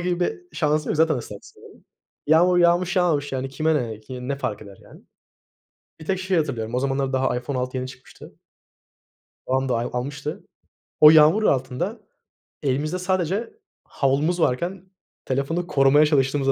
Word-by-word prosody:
gibi 175 0 -2
bir 355 - -4
şansım 150 -1 0
yok - - -1
zaten 160 0 +3
ıslaksın. 105 -4 -11 0.4
Yağmur 175 +4 +4
yağmış 175 +2 +2
yağmış, 150 -6 +1
yani, 135 0 -3
kime 155 +3 0
ne, 115 -6 -3
kim 125 +3 -8
ne 140 - -1
fark 105 -6 -4
eder, 100 -1 -13
yani? - - -16 1.0
Bir 155 - -11
tek 190 +1 -1
şeyi 185 -1 0
hatırlıyorum, 120 -7 -3
o 125 - +1
zamanlar 135 0 -1
daha 130 -1 0
iPhone 130 +2 -4
6 125 +1 -3
yeni 130 0 -3
çıkmıştı. 130 0 -14 1.1
Babam 130 +1 0
dahi 120 -1 0
almıştı. 145 +4 -5 0.6
O 150 - +10
yağmur 160 +7 +6
altında 140 - -1 0.6
elimizde 150 +6 -1
sadece 185 - -1 0.3
havlumuz 145 +6 0
varken 175 +8 -1 0.4
telefonu 140 +7 -2
korumaya 140 +1 +4
çalıştığımızı 135 -2 +1
145 Hz, 150 wpm, -23 LUFS, 130-175 Hz, 1.1 s, O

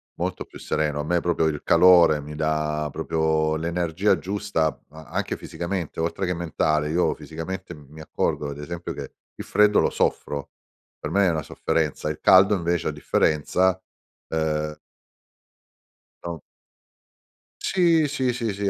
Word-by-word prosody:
molto - - -3
più - - -13
sereno. 75 -1 -1
A - - -4
me 85 +3 +1
proprio 85 -1 0
il 75 -2 -1
calore 85 -2 +6
mi 75 +1 -9
dà 75 0 -1
proprio 80 0 0
l'energia 85 +4 0
giusta 100 0 -1 0.2
a 80 +1 -12
anche - - -2
fisicamente 85 -2 -5
oltre 85 +3 -1
che 90 - 0
mentale, 75 -3 0
io 85 +3 +2
fisicamente 85 +3 -7
m 75 -1 -15
mi 80 +1 -11
accorgo 75 -1 -2
ad 70 - -7
esempio 85 +4 -6
che - - -7 0.2
il - - -7
freddo 105 0 +4
lo - - +2
soffro, 70 -2 -1 0.5
per - - -6
me 100 -1 +3
è - - +4
una 80 -3 -1
sofferenza. 75 0 -1
Il 75 - -5
caldo 95 +2 +6
invece 85 -2 -1
a - - 0
differenza, 90 +4 +1 0.5
ehm 75 -1 -1 1.5
no - - -5 1.2
Sì, 170 -4 +3
sì, 130 -3 0
sì, 115 -4 -2
sì, 100 0 -1
80 Hz, 150 wpm, -24 LUFS, 75-95 Hz, 1.5 s, calore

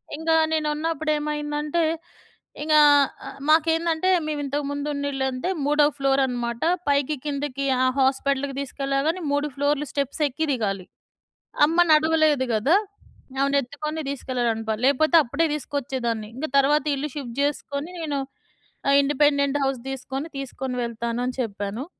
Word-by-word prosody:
ఇంగా 320 +1 +1 0.2
నేనున్నప్పుడు 310 0 -1
ఏమైందంటే, 295 +2 -2 0.8
ఇంగా 305 0 +5 0.5
అ - - -5 0.2
మాకేందంటే 325 +2 +3 0.2
మేమింతకు 290 -1 -2
ముందున్న 285 0 -2
ఇళ్ళంటే 265 +3 -2 0.2
3 295 0 +4
ఫ్లోరన్నమాట. 260 -4 0 0.3
పైకి 285 +1 +2
కిందకి 280 -1 -3 0.2
ఆ - - +4
హాస్పిటల్‌కి 270 +1 +1
తిసుకెళ్ళగాని 275 +5 -1
3 285 +1 +1
ఫ్లోరులు 290 +1 0
స్టెప్స్ 280 +2 -2
ఎక్కి 310 +4 -3
దిగాలి. 195 -6 -2 0.8
అమ్మ 325 +3 -1
నడవలేదు 310 -3 +4
గదా! 265 - +3 0.6
ఆమెనెత్తుకొని 280 +3 -1
తీసుకెళ్ళాలనుకో. 235 -5 -2
లేపోతే 310 +5 +3
అప్పుడే 280 +7 0
తీసుకొచ్చేదాన్ని. 255 -6 -3
ఇంక 295 +4 -3
తర్వాత 290 +2 +3
"ఇల్లు 295 +2 -3
షిఫ్ట్ 255 -3 -6
చేసుకొని, 290 +2 -3
నేను 290 -3 -2 0.7
ఆ - - +5
ఇండిపెండెంట్ 285 0 +2
హౌస్ 270 -2 0
తీసుకొని, 270 +2 -4
తీసుకొని 265 -1 -5
వెళ్తాను." 235 +1 -3
అని 255 - -3
చెప్పాను. 205 +4 -5
280 Hz, 115 wpm, -24 LUFS, 265-300 Hz, 0.8 s, ఇంగా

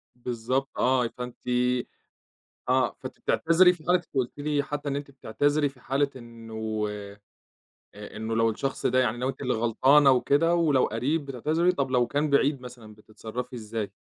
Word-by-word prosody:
بالضبط 125 +2 -2
آه 125 -2 +2
فأنتِ 125 +1 -8 1.3
آه، - - +2
فأنتِ - - -9
بتعتذري 180 +2 +4
في 160 -3 -14
حالة 180 0 +4
قُلتِ 130 +2 -1
لي 145 -1 0
حتى 145 0 -4
إن 140 - -2
أنت 140 -1 -5
بتعتذري 145 +3 0
في 130 -2 -20
حالة 140 +2 0
إنه 110 -3 -5 0.9
آآ 105 +1 -13
إنه 110 +1 -3
لو 115 0 +3
الشخص 135 +5 -3
ده 130 +1 +2
يعني 120 -2 +1
لو 130 +1 -1
أنتِ 135 - -5
اللي 125 - 0
غلطانة 130 +5 +4
وكده 145 +6 +3
ولو 150 -6 +3
قَريب 140 +7 -1
بتعتذري 155 +7 +1
طب 135 -6 -2
لو 125 -2 +2
كان 145 +3 -1
بعيد 140 -1 +2
مثلًا، 120 -4 -11
بتتصرفي 115 +4 -8
إِزّاي؟ 110 -2 -5
130 Hz, 160 wpm, -26 LUFS, 115-145 Hz, 1.3 s, بتعتذري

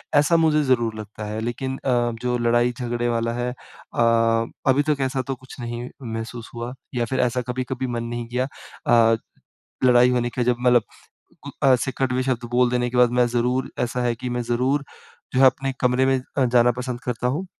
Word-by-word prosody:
ऐसा 150 +3 +5
मुझे 155 -2 +3
ज़रूर 120 -5 +1
लगता 105 0 -8
है। 105 +1 -4
लेकिन 130 +3 -3
अ, 135 - -4 0.3
जो 125 0 0
लड़ाई-झगड़े 120 0 0
वाला 115 0 0
है 120 +1 -2
अ, 125 - -8 0.7
अभी 135 +2 +4
तक 145 -2 +1
ऐसा 130 0 0
तो 135 - -2
कुछ 130 +1 -14
नहीं 120 +1 -5 0.2
महसूस 115 +1 -6
हुआ 120 +1 -5 0.2
या 120 -1 +1
फिर 130 - -2
ऐसा 125 +1 +1
कभी-कभी 130 +1 -3
मन 120 -1 -3
नहीं 120 0 -4
किया। 125 +2 -1 0.4
अ, 115 -1 +5 0.7
लड़ाई 125 0 +6
होने 120 -1 +1
के 125 - -1
जब 125 0 +2
मतलब 125 -2 +4 0.6
उ - - -5 0.2
ऐसे 130 0 +3
कड़वे 130 -1 +1
शब्द 130 -2 -1
बोल 125 0 +3
देने 125 0 0
के 125 - -3
बाद 125 -1 +5
मैं 120 - +5
ज़रूर 125 +2 0
ऐसा 120 +1 -1
है 120 -1 +1
कि 125 +2 -5
मैं 120 - -2
ज़रूर 130 +4 0 0.5
जो 130 - +3
है 135 - +8
अपने 135 +1 +2
कमरे 125 +1 +3
में 135 0 +3 0.2
अ, 135 - +4
जाना 120 -1 +4
पसंद 125 0 -5
करता 125 -1 -3
हूँ। 155 +9 -2
125 Hz, 200 wpm, -23 LUFS, 120-130 Hz, 0.7 s, है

